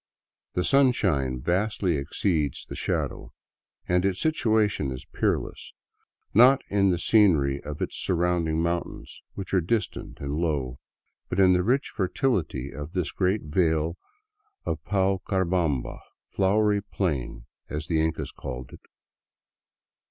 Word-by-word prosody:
The 90 - +1
sunshine 95 - +2
vastly 95 -1 0
exceeds 75 0 -1
the - - -8
shadow, - - -2 0.5
and 90 0 +2
its 95 -1 0
situation 110 - +1
is 65 - -7
peerless - - -2 0.3
— - - -41 0.3
not 130 +5 +6
in 100 -1 +3
the 90 - +2
scenery 80 -10 +3
of 75 0 -4
its - - -4
surrounding 85 -2 +1
mountains, 85 0 -4
which 95 -1 -7
are 95 - +4
distant 105 +6 -2
and 70 0 -4
low, 70 -7 -1 0.5
but 90 - -2
in 95 -1 +6
the 90 - +3
rich 125 +9 +1
fertility 90 - -1
of 75 +4 -7
this 90 -6 -1
great 95 +2 0
vale 80 +1 +1 0.7
of - - -3
Paucarbamba 95 -6 0 0.2
(" - - -48
Flowery 105 +1 +2
Plain"), 70 -12 -3 0.2
as 75 +2 -4
the 80 -2 +1
Incas 80 0 -2
called 65 -1 -7
it. - - -12
90 Hz, 130 wpm, -26 LUFS, 75-100 Hz, 0.7 s, not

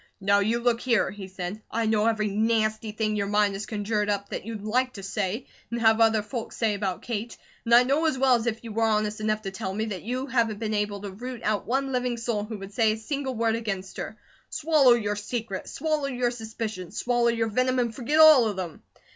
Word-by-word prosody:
"Now 200 +1 +3
you 220 +4 +1
look 235 -1 +1
here," 235 -6 +2
he 195 -1 -8
said. 190 +2 -6
"I 230 0 -1
know 215 0 +2
every 220 -2 +1
nasty 215 +1 0
thing 215 0 -1
your 200 -1 -1
mind 205 0 +2
has 195 +1 -5
conjured 210 -1 -1
up 200 -1 -1
that - - -5
you'd 220 -3 -5
LIKE 250 +4 0
to 195 - -9
say, 195 +4 -2 0.2
and 235 - -3
have 220 0 +4
other 220 -2 +4
folks 230 +1 -6
say, 225 -2 +1
about 195 -3 -3
Kate. 230 -1 -4 0.3
And 235 0 +5
I 245 - +8
know 280 +6 +1
as 310 - 0
well 260 -1 +4
as 235 -1 +1
if 230 0 -2
you 230 - -7
were 225 +2 -2
honest 215 -1 +1
enough 215 0 0
to 195 - -4
tell 190 0 -4
me, 215 +1 -1
that 200 -5 -5
you 255 +4 -3
haven't 235 -5 0
been 220 0 -3
able 205 -1 -1
to 200 -1 -6
root 245 +4 -7
out 215 -1 -1
one 270 +3 0
living 250 -1 -1
soul 230 -3 -2
who 215 0 -6
would 195 0 -9
say 220 -1 +3
a - - -5
single 265 +3 -3
word 225 0 +1
against 195 -4 -4
her. 215 - -6 0.3
Swallow 290 -5 +4
your 210 -3 0
secret! 210 -1 -4
Swallow 305 -1 -1
your 250 -2 0
suspicions! 220 -5 -6
Swallow 240 -1 +2
your 230 -1 +1
venom, 255 +3 +1
and 240 -2 0
forget 280 +6 0
all 310 -7 +8
of 210 - -2
them. 180 -4 -6
220 Hz, 235 wpm, -26 LUFS, 210-240 Hz, 0.3 s, I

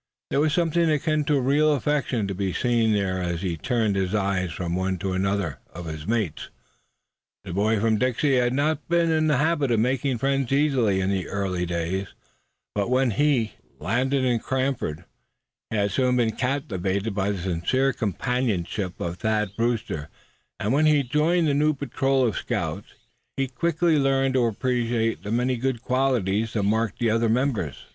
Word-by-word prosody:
There - - +2
was 155 +1 +2
something 170 -1 +2
akin 155 0 +1
to 145 -1 +2
real 145 +4 +3
affection 130 -5 0
to 100 - -3
be 95 -1 -2
seen 115 -2 +2
there 95 -3 0
as 85 0 -3
he 90 -3 -1
turned 110 - 0
his 95 +1 0
eyes 95 -3 0
from 85 +2 -3
one 95 0 -1
to 95 +1 -3
another 95 -6 -1
of 85 +1 -8
his 80 0 -6
mates. 110 -8 -1 0.9
The 90 - -7
boy 105 +3 +2
from 110 0 +2
Dixie 130 +2 +2
had 120 -1 +2
not 150 +4 -1
been 170 -1 +3
in 155 -1 +2
the 150 -4 +3
habit 150 -1 +1
of 115 -2 +2
making 130 +2 0
friends 135 +1 0
easily 135 -9 +2
in 95 +1 0
earlier 95 -3 -2
days; 85 +3 -2 0.7
but 100 +1 -1
when 130 -1 +2
he 130 -3 +1 0.2
landed 130 +6 0
in 120 -2 +2
Cranford 130 - -2 0.6
he - - -3
had 100 -1 +1
soon 125 +4 +2
been 115 -2 +2
captivated 105 - -1
by 100 0 0
the 100 - -1
sincere 95 +10 0
companionship 105 -4 -2
of 85 +1 -3
Thad 105 -2 0
Brewster; 115 -10 -2 0.5
and 105 +5 0
when 155 +2 +4
he 150 -2 +4
joined 155 +6 +2
the 145 - +2
new 150 +1 +2
patrol 135 -1 0
of 115 - +1
the - - -3
scouts - - -3 0.5
he 135 0 0
quickly 160 +4 +1
learned 135 -1 +2
to 130 -2 +3
appreciate 115 0 0
the 100 - -6
many 125 +2 +1
good 125 -1 -2
qualities 115 -5 0
that 105 - 0
marked 110 +2 0
the 115 -2 +1
other 115 0 +2
members. 115 - -1
115 Hz, 175 wpm, -25 LUFS, 100-135 Hz, 0.9 s, when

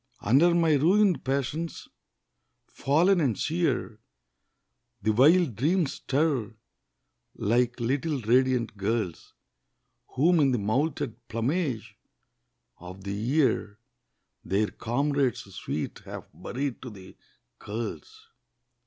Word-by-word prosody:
Under 150 - +4
my 165 -2 +3
ruined 185 +5 +3
passions, 140 +5 -3 0.8
fallen 170 +7 +2
and 125 - +1
sere, 160 - -1 1.0
The 110 +1 +2
wild 150 - +4
dreams 155 - +1
stir, 135 -6 -1 0.8
like 120 +3 +1
little 140 +5 -1
radiant 125 0 +2
girls, 100 -3 -3 0.8
Whom 165 +6 +4
in 135 -3 +3
the - - +2
moulted 125 +2 -2
plumage 115 - -2 0.8
of 90 +2 -10
the 100 0 -4
year 115 -2 0 0.7
Their 105 +2 0
comrades 140 +1 0
sweet 80 -4 -4
have - - -8
buried 135 -1 -4
to 130 - -7
the 95 -4 -13 0.4
curls. 435 - -7
130 Hz, 100 wpm, -27 LUFS, 110-155 Hz, 1.0 s, Under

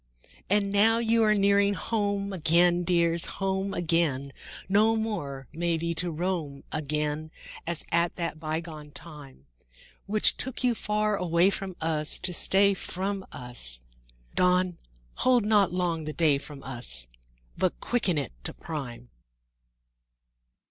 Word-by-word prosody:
IV - - -27 0.2
And 200 - -4
now 220 +3 +5
you 230 0 +2
are 215 -1 +4
nearing 200 0 +3
home 200 -2 -1
again, 175 +1 +3
Dears, 170 -1 +2
home 195 0 -1
again; 160 -7 0 0.3
No 215 +4 +4
more, 175 -12 -3
may 170 +1 0
be, 170 +1 -2
to 175 +2 0
roam 165 -4 -3
again 150 0 -2 0.4
As 170 -1 -3
at 170 0 +1
that 165 -3 -3
bygone 155 -1 -5
time, 145 - -11 0.6
Which 210 +1 +4
took 260 0 -2
you 250 -1 +3
far 210 -1 0
away 175 0 +3
from 190 -2 -4
us 155 -1 0
To 180 - -4
stay 200 +3 +3
from 195 +1 -3
us; 120 - -4 0.5
Dawn, 180 -1 +2 0.4
hold 250 -3 +3
not 210 -4 +4
long 175 -3 -1
the 155 - -4
day 150 -4 +3
from 140 -1 -10
us, 120 - 0 0.5
But 185 - 0
quicken 210 -9 +1
it 140 -4 -2
to - - -4
prime! 125 -7 -7
170 Hz, 135 wpm, -27 LUFS, 150-200 Hz, 0.6 s, now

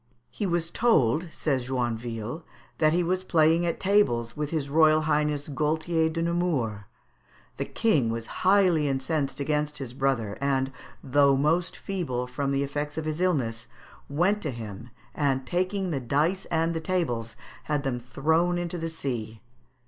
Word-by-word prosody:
"He 205 - -2
was 170 -1 -1
told," 165 - +3
says 135 -7 -1
Joinville, 120 +1 -3 0.4
"that 155 -1 +4
he 175 +2 +2
was 185 +2 0
playing 165 -1 +3
at 170 - -2
tables 120 - +2
with 150 -1 -2
his 155 -3 -2
Royal 155 +1 +5
Highness 150 -1 0
Gaultier 160 +3 0
de 165 +1 -2
Nemours. 165 - 0 0.8
The - - -2
King 175 - +1
was 115 0 -3 0.2
highly 185 -5 +4
incensed 135 +1 -1
against 150 +1 -1
his 130 -3 -6
brother, 130 -7 -1
and, 135 -1 +1 0.3
though 140 0 +4
most 165 +6 +1
feeble 155 -11 -3
from 135 +2 -2
the 140 0 +1
effects 145 +2 -4
of 160 - -2
his 155 +2 -2
illness, 120 -10 0 0.4
went 180 +9 +1
to 155 - -2
him, 115 -1 -7 0.2
and 135 -2 0
taking 185 +4 -1
the 140 - -1
dice 150 +10 0
and 165 0 0
the 165 - -3
tables, 125 -11 -1 0.3
had 150 -2 -1
them 130 -3 -1
thrown 160 +8 +1
into 175 0 -3
the 165 0 -3
sea." 120 -9 -4
150 Hz, 155 wpm, -27 LUFS, 130-170 Hz, 0.8 s, Royal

